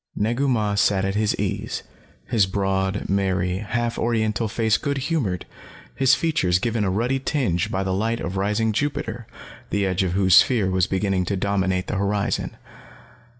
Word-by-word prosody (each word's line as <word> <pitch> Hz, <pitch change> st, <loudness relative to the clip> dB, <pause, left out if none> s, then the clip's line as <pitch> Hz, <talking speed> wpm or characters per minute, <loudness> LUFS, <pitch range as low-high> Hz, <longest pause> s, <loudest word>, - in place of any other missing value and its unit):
Negu 120 Hz, +7 st, 0 dB
Mah 110 Hz, -5 st, +1 dB
sat 100 Hz, -1 st, +2 dB
at 95 Hz, -, -1 dB
his 105 Hz, 0 st, +1 dB
ease, -, -, -3 dB, 0.4 s
his 110 Hz, -6 st, +2 dB
broad, 95 Hz, 0 st, -1 dB
merry, 95 Hz, -2 st, 0 dB
half 115 Hz, +3 st, -2 dB
Oriental 110 Hz, -1 st, 0 dB
face 110 Hz, +1 st, +1 dB
good 140 Hz, -1 st, -2 dB
humored, 130 Hz, -, -1 dB, 0.5 s
his 135 Hz, 0 st, +4 dB
features 150 Hz, -, +1 dB
given 115 Hz, +2 st, -1 dB
a 100 Hz, -, +1 dB
ruddy 120 Hz, +8 st, 0 dB
tinge 125 Hz, -, 0 dB
by 95 Hz, -, -1 dB
the 95 Hz, -1 st, -1 dB
light 115 Hz, +4 st, -1 dB
of 95 Hz, -, -4 dB
rising 105 Hz, +3 st, +1 dB
Jupiter, 115 Hz, -1 st, -3 dB, 0.4 s
the 100 Hz, -1 st, 0 dB
edge 95 Hz, 0 st, 0 dB
of 90 Hz, -2 st, 0 dB
whose 95 Hz, -1 st, +5 dB
sphere 110 Hz, -7 st, +4 dB
was 95 Hz, -1 st, +2 dB
beginning 95 Hz, -1 st, 0 dB
to 100 Hz, +3 st, -1 dB
dominate 95 Hz, -1 st, 0 dB
the -, -, -3 dB
horizon. 100 Hz, +1 st, -1 dB
100 Hz, 165 wpm, -23 LUFS, 95-115 Hz, 0.5 s, whose